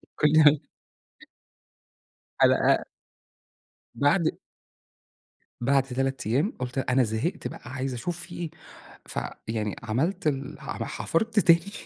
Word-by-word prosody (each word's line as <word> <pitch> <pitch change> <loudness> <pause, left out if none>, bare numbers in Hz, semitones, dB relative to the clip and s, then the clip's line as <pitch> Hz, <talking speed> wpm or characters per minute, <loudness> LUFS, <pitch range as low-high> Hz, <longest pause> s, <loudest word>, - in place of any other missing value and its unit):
كلها 150 -1 +6 1.8
حلقة - - +4 1.1
بَعد 155 +3 +2 1.2
بعد 135 +3 +3
3 135 -1 -2
أيام 140 - +1
قُلت 125 +1 -3
أنا 130 0 +2
زهقت 110 - -2
بقى - - -10
عايزة 130 -1 -3
أشوف 170 +8 -4
في 175 0 -10
إيه، 170 -3 -4 0.6
فيعني 110 -2 -4
عملت 135 - 0
ال 135 -2 -2
حم - - -10
أنا - - -3
حفرت 220 +5 0
تاني 170 +1 +4
140 Hz, 105 wpm, -26 LUFS, 125-165 Hz, 1.8 s, كلها